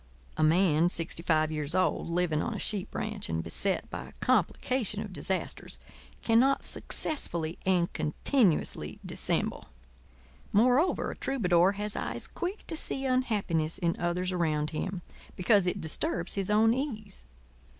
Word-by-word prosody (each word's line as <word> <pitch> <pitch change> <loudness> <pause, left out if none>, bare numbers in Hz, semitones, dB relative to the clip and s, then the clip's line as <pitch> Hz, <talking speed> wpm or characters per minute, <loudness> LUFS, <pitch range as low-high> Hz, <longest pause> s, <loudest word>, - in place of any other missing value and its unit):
A - - -2
man 165 0 +4
sixty 165 -1 -1
five 155 -2 +2
years 150 +1 -1
old, 185 -2 +1
living 170 -3 +1
on 235 - -3
a - - -4
sheep 200 -3 -3
ranch - - -3
and 80 0 -1
beset 190 - 0
by - - -5
a - - -13
complication 245 -6 0
of 205 - -9
disasters, 185 +4 -1 0.5
cannot 250 +4 +3
successfully 170 - -1
and 180 -2 +2
continuously 165 - +1
dissemble. - - -1 0.8
Moreover, 250 - +3
a - - -8
troubadour 185 -8 +2
has 210 +1 -3
eyes - - -1
quick 365 +4 -5
to 320 - -4
see 270 -3 -2
unhappiness 205 -11 0
in 170 -2 0
others 175 +2 -1
around 155 -4 0
him—because 185 +3 -1
it 180 - -1
disturbs 170 +2 0
his 195 -1 -2
own 220 +2 +4
ease. 220 -7 -5
185 Hz, 140 wpm, -29 LUFS, 165-225 Hz, 0.8 s, man